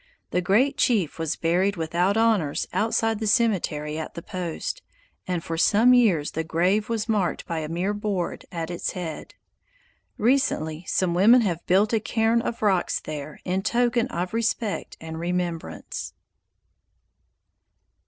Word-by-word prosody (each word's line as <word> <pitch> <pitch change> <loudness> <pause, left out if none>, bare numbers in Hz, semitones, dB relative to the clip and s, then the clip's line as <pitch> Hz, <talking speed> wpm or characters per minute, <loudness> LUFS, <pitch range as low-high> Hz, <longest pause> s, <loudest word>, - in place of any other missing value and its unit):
The 180 - +1
great 245 +10 +2
chief 195 - +1
was 160 -1 -1
buried 180 +4 +1
without 175 +5 0
honors 215 -10 +2
outside 225 0 +1
the 220 - -2
cemetery 165 - +1
at 160 - -6
the 170 - -7
post, 185 - -4 0.5
and 180 -2 -2
for 165 0 -3
some 225 +8 +5
years 195 -12 +3
the 160 - -2
grave 180 +7 +1
was 225 -1 -1
marked 205 -6 0
by 165 -1 -3
a 155 -1 -5
mere 180 +5 -1
board 205 -4 -3
at 165 -1 -4
its 175 - -3
head. 170 -4 -6 0.8
Recently 205 - +1
some 180 -2 +1
women 220 +8 +6
have 175 -6 -1
built 200 +5 +3
a 225 - +3
cairn 225 +2 +1
of 235 -1 -4
rocks 190 -4 +2
there 150 -1 -7
in 185 +1 0
token 240 +2 +1
of 180 -1 -4
respect 225 -2 -2
and 160 0 -7
remembrance. 170 - -4
185 Hz, 145 wpm, -25 LUFS, 165-225 Hz, 0.8 s, women